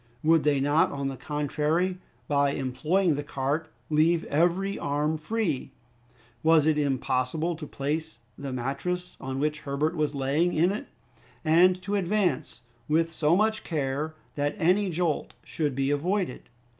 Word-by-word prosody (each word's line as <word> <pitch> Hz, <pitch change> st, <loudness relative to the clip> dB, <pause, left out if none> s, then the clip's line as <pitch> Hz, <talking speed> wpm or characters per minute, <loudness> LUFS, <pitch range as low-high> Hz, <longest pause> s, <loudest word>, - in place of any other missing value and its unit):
Would 160 Hz, 0 st, +4 dB
they 145 Hz, -2 st, +3 dB
not, 145 Hz, +3 st, +3 dB
on 140 Hz, -1 st, -2 dB
the 135 Hz, -, -5 dB
contrary, 150 Hz, +6 st, -1 dB, 0.3 s
by 140 Hz, -1 st, +2 dB
employing 155 Hz, +8 st, +1 dB
the 145 Hz, 0 st, -3 dB
cart 145 Hz, +2 st, -2 dB, 0.2 s
leave 160 Hz, +2 st, +3 dB
every 175 Hz, +6 st, +1 dB
arm 150 Hz, +2 st, 0 dB
free? 160 Hz, -, -2 dB, 0.7 s
Was 160 Hz, 0 st, +5 dB
it 155 Hz, -1 st, +3 dB
impossible 140 Hz, +4 st, 0 dB
to 155 Hz, -2 st, -8 dB
place 155 Hz, +3 st, -3 dB, 0.2 s
the 140 Hz, -1 st, -6 dB
mattress 175 Hz, +9 st, -3 dB
on 130 Hz, 0 st, -4 dB
which 150 Hz, +2 st, 0 dB
Herbert 145 Hz, +3 st, -1 dB
was 150 Hz, -2 st, 0 dB
lying 140 Hz, +6 st, +1 dB
in 170 Hz, +4 st, +3 dB
it, 210 Hz, -, -5 dB, 0.6 s
and 180 Hz, +3 st, +5 dB
to 200 Hz, -, -3 dB
advance 185 Hz, -10 st, 0 dB, 0.2 s
with 165 Hz, +2 st, +1 dB
so 160 Hz, +1 st, +3 dB
much 220 Hz, +2 st, +1 dB
care 150 Hz, 0 st, -2 dB, 0.2 s
that 145 Hz, +4 st, -1 dB
any 190 Hz, +2 st, +3 dB
jolt 170 Hz, -2 st, -1 dB
should 150 Hz, -5 st, -2 dB
be 135 Hz, +1 st, +1 dB
avoided? 175 Hz, +2 st, -1 dB
155 Hz, 145 wpm, -27 LUFS, 140-175 Hz, 0.7 s, Was